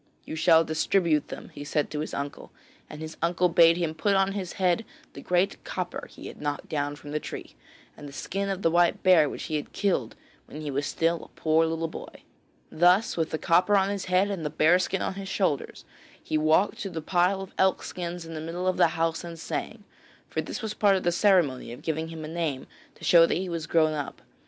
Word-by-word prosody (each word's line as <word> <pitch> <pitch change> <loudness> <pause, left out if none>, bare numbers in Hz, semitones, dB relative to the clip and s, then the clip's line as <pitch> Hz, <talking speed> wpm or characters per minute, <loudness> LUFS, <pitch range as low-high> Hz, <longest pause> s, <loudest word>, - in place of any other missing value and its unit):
'You - - -6
shall 165 0 +5
distribute 160 0 +1
them,' - - -8
he 145 - -9
said 150 0 -1
to 150 - -3
his 155 - -4
uncle, 140 0 -6 0.4
and 150 - -9
his 160 0 -7
uncle 175 +2 +2
bade 165 0 +6
him 170 -3 -1
put 200 +5 +1
on 195 0 +3
his 195 -3 -4
head 185 +3 +1 0.3
the - - -9
great 180 +2 0
copper 180 -1 -5
he - - -12
had - - -9
knocked 145 -1 -3
down 145 -1 -2
from 145 0 -11
the 150 - -1
tree, - - -8 0.4
and 145 - -10
the - - -12
skin 195 +8 -3
of 195 0 -3
the 165 - +3
white 175 0 +2
bear 170 -6 +6
which - - -6
he 155 -2 -2
had 150 - -7
killed 175 - 0 0.3
when 150 - -8
he 150 -2 -4
was 140 +2 -1
still 165 0 0
a - - -21
poor 160 +1 +3
little 165 0 -2
boy. - - -10 0.5
Thus 180 +6 +4
with 165 -1 -1
the 160 - -2
copper 180 +6 +3
on 195 0 +2
his 200 -2 -3
head 185 +3 +2
and 185 -5 -4
the 150 - -1
bear 160 +4 +4
skin 185 +1 -1
on - - -2
his 195 0 -7
shoulders 185 -8 -1 0.3
he - - -4
walked 155 +6 +2
to 195 - -4
the 165 -3 -5
pile 180 +3 +2
of 195 -1 -8
elk 190 -1 +3
skins 175 -1 -5
in 165 - -8
the 155 - -5
middle 170 +3 -4
of 185 -1 +1
the - - +6
house 165 +1 0
and 170 -1 -7
sang, - - -5 0.4
for - - -2
this - - -6
was 215 -1 -3
part 200 -2 +3
of 185 - -1
the 175 - +2
ceremony 175 - +2
of 120 - -10
giving 160 0 -2
him 160 -1 -7
a - - -6
name 160 -5 -3 0.3
to - - -17
show 165 -1 +6
that - - 0
he 185 +1 -3
was 165 -2 -4
grown 155 -2 +3
up. 145 -2 -5
165 Hz, 235 wpm, -27 LUFS, 155-185 Hz, 0.5 s, bade